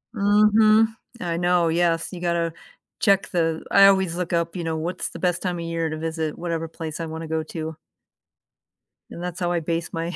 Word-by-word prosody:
Mhm, 215 Hz, +2 st, +5 dB, 0.3 s
I 170 Hz, -1 st, -2 dB
know, 175 Hz, -1 st, +2 dB
yes, 165 Hz, 0 st, +1 dB
you 180 Hz, -, -7 dB
gotta 170 Hz, -1 st, 0 dB, 0.5 s
check 195 Hz, -1 st, +3 dB
th 165 Hz, -2 st, 0 dB
I 195 Hz, 0 st, +8 dB
always 190 Hz, -3 st, +3 dB
look 180 Hz, -1 st, -3 dB
up, 170 Hz, +1 st, 0 dB
you 175 Hz, -, -3 dB
know, 165 Hz, -1 st, -2 dB
what's 170 Hz, +3 st, -3 dB
the -, -, -9 dB
best 180 Hz, -2 st, 0 dB
time 180 Hz, -2 st, -2 dB
of 170 Hz, -, -4 dB
year 165 Hz, -1 st, -2 dB
to 155 Hz, -, -4 dB
visit 160 Hz, -1 st, -3 dB
whatever 165 Hz, -1 st, -3 dB
place 160 Hz, 0 st, -7 dB
I 165 Hz, -, -2 dB
wanna 160 Hz, 0 st, -6 dB
go 160 Hz, 0 st, -1 dB
to. 160 Hz, 0 st, -6 dB, 1.3 s
And 170 Hz, -, -8 dB
that's 180 Hz, -1 st, -5 dB
how 175 Hz, -1 st, 0 dB
I 175 Hz, -, +1 dB
base 165 Hz, +1 st, -3 dB
my 165 Hz, +2 st, -3 dB
170 Hz, 200 wpm, -23 LUFS, 165-180 Hz, 1.3 s, I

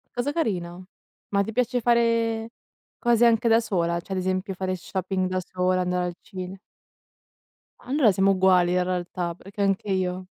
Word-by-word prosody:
Cosa 245 Hz, +4 st, -1 dB
carino 185 Hz, -, -3 dB, 0.4 s
ma 200 Hz, 0 st, +2 dB
ti 220 Hz, -, -5 dB
piace 245 Hz, +1 st, 0 dB
fare 230 Hz, -1 st, +2 dB, 0.5 s
cose 240 Hz, -1 st, +3 dB
anche 230 Hz, 0 st, +3 dB
da 225 Hz, 0 st, +6 dB
sola? 170 Hz, -6 st, -1 dB
Cioè 190 Hz, +3 st, -6 dB
ad 185 Hz, -, -1 dB
esempio 185 Hz, +1 st, -2 dB
fare 185 Hz, 0 st, -2 dB
shopping 185 Hz, +1 st, -2 dB
da 185 Hz, 0 st, -1 dB
sola, 185 Hz, 0 st, +1 dB
andare 180 Hz, 0 st, 0 dB
al 175 Hz, -1 st, -4 dB
cine 185 Hz, -1 st, -7 dB, 1.2 s
Allora 260 Hz, -4 st, +3 dB
siamo 195 Hz, +1 st, +3 dB
uguali 185 Hz, -2 st, +4 dB
in 180 Hz, 0 st, +2 dB
realtà, 180 Hz, -1 st, -3 dB
perché 195 Hz, +3 st, -8 dB
anche 195 Hz, +1 st, 0 dB
io. 185 Hz, -1 st, -1 dB
190 Hz, 160 wpm, -25 LUFS, 180-225 Hz, 1.2 s, da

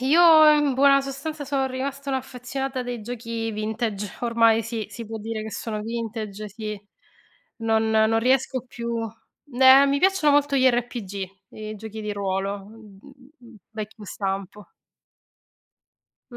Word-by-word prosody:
io 310 Hz, +3 st, +7 dB
in 295 Hz, -3 st, +2 dB
buona 275 Hz, +1 st, +5 dB
sostanza 280 Hz, +3 st, -5 dB
son 275 Hz, -1 st, 0 dB
rimasta 275 Hz, +2 st, -4 dB
un'affezionata 265 Hz, 0 st, -4 dB
dei 245 Hz, -1 st, -5 dB
giochi 230 Hz, 0 st, -4 dB
vintage. 215 Hz, -2 st, -3 dB
Ormai 230 Hz, -1 st, +3 dB
sì, 225 Hz, -1 st, -4 dB
si 225 Hz, +2 st, -8 dB
può 225 Hz, +1 st, -6 dB
dire 220 Hz, 0 st, -4 dB
che 220 Hz, -, -6 dB
sono 215 Hz, -1 st, -4 dB
vintage, 215 Hz, -2 st, -5 dB
sì. 210 Hz, 0 st, -6 dB, 0.8 s
Non 225 Hz, 0 st, +1 dB
non 220 Hz, +1 st, +3 dB
riesco 260 Hz, +1 st, +1 dB
più 235 Hz, -1 st, -4 dB, 0.5 s
eh, 265 Hz, +2 st, +7 dB
mi 280 Hz, 0 st, +1 dB
piacciono 375 Hz, -4 st, +3 dB
molto 290 Hz, -1 st, +2 dB
gli 260 Hz, 0 st, +4 dB
RPG, 225 Hz, -6 st, -3 dB, 0.2 s
i 215 Hz, 0 st, -7 dB
giochi 220 Hz, +1 st, -8 dB
di 210 Hz, -1 st, -3 dB
ruolo, 195 Hz, 0 st, -2 dB
uhm, 210 Hz, -2 st, -15 dB, 0.7 s
vecchio 215 Hz, -1 st, -8 dB
stampo. 195 Hz, +1 st, -5 dB, 1.6 s
Mh, 240 Hz, -, -9 dB
230 Hz, 135 wpm, -24 LUFS, 215-265 Hz, 1.6 s, io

